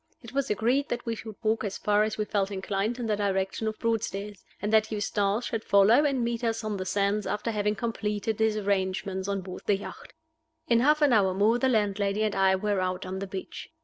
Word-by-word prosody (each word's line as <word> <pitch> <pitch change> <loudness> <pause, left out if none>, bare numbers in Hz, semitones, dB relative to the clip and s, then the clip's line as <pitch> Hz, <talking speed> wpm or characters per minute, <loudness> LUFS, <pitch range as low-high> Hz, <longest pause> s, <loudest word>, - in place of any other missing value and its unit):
It 235 +1 -11
was 275 0 0
agreed 245 +7 +1
that 240 0 -3
we 230 - -1
should 220 -1 -8
walk 220 +1 +1
as 200 -2 -3
far 210 0 +2
as 215 0 0
we 215 - -1
felt 200 -2 0
inclined 200 +3 -2
in 245 - -4
the 215 -1 +1
direction 195 +1 -1
of 215 0 -3
Broadstairs, 210 -3 -2 0.2
and 210 +1 -2
that 220 0 +4
Eustace 205 +1 0
should 225 -2 -3
follow 210 +8 +5
and 270 -4 +1
meet 235 0 -2
us 225 -1 -1
on 215 -2 -2
the 185 0 -4
sands, 200 +1 0
after 210 +3 -2
having 210 -1 0
completed 215 -2 -2
his 220 -1 +2
arrangements 190 -1 -1
on 200 -1 -1
board 185 0 -8
the 205 - +3
yacht. 200 - -10 0.5
In 235 -1 +4
half 300 +4 +4
an 280 -4 +5
hour 190 -4 +3
more 215 +5 +3
the 265 - +2
landlady 205 -2 +1
and 215 -1 0
I 190 -1 +3
were 205 +1 0
out 185 0 -2
on 185 +1 -4
the 195 - -4
beach. 190 0 -7
210 Hz, 225 wpm, -27 LUFS, 195-225 Hz, 0.5 s, follow